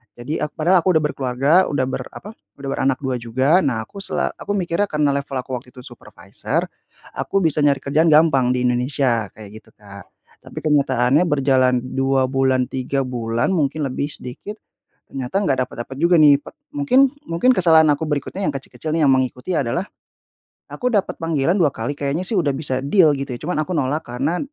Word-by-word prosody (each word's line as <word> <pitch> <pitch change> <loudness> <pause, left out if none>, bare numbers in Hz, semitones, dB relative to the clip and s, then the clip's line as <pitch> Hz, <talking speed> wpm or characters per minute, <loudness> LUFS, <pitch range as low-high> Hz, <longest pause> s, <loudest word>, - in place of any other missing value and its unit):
Jadi, 125 +6 -5
aku 150 - -2
padahal 175 +2 +3
aku 185 - +3
udah 155 - 0
berkeluarga 135 0 -2 0.2
udah 135 -3 0
ber - - -4
apa, 210 - -10 0.3
udah 140 - -7
beranak 135 -1 0
2 130 -2 -2
juga, 130 +9 +2
nah 120 -5 0
aku 200 - -12
sela - - -1
aku - - -6
mikirnya 175 +1 0
karena 150 -2 +1
level 140 0 -4
aku 125 +1 -8
waktu 125 +1 -13
itu 125 - -11
supervisor 120 - -5 0.5
aku 195 - -1
bisa 155 -2 +1
nyari 140 -2 +3
kerjaan 155 +4 +2
gampang 150 -5 +4
di 125 0 -1
Indonesia 125 -2 0
kayak 105 -2 -12
gitu, - - -24
Kak, 100 -2 -13 0.4
tapi - - -8
kenyataannya 140 -1 +2
berjalan 130 -3 +2
2 135 +1 0
bulan 130 -1 +1
3 135 +1 -2
bulan 120 0 -1
mungkin 150 0 -1
lebih 135 +2 -3
sedikit, 135 - -8 0.5
ternyata 135 +6 -3
nggak 135 -10 +1
dapat-dapat 120 +3 -8
juga, 170 +4 +3
nih, 145 -2 +6
pet - - -13 0.2
mungkin 275 -1 +4 0.2
mungkin 170 +10 +2
kesalahan 160 -3 +5
aku 145 - -6
berikutnya 150 +6 -3
yang - - +1
kecil-kecil, 155 +3 -6
nih, 165 - +2
yang 135 - +5
mengikuti 130 +5 -2
adalah 140 +7 -1 0.8
aku 250 -1 -2
dapat 200 - 0
panggilan 165 +1 +1
dua 165 -6 +3
kali 115 +6 -4
kayaknya 145 +5 -2
sih 225 - -2
udah 155 -5 +2
bisa 135 -2 -2
deal 155 +1 +4
gitu 135 -1 -5
ya, - - -24
cuman 155 -1 -1
aku 170 - -8
nolak 145 +2 -1
karena 125 +8 -2
140 Hz, 190 wpm, -20 LUFS, 130-160 Hz, 0.8 s, nih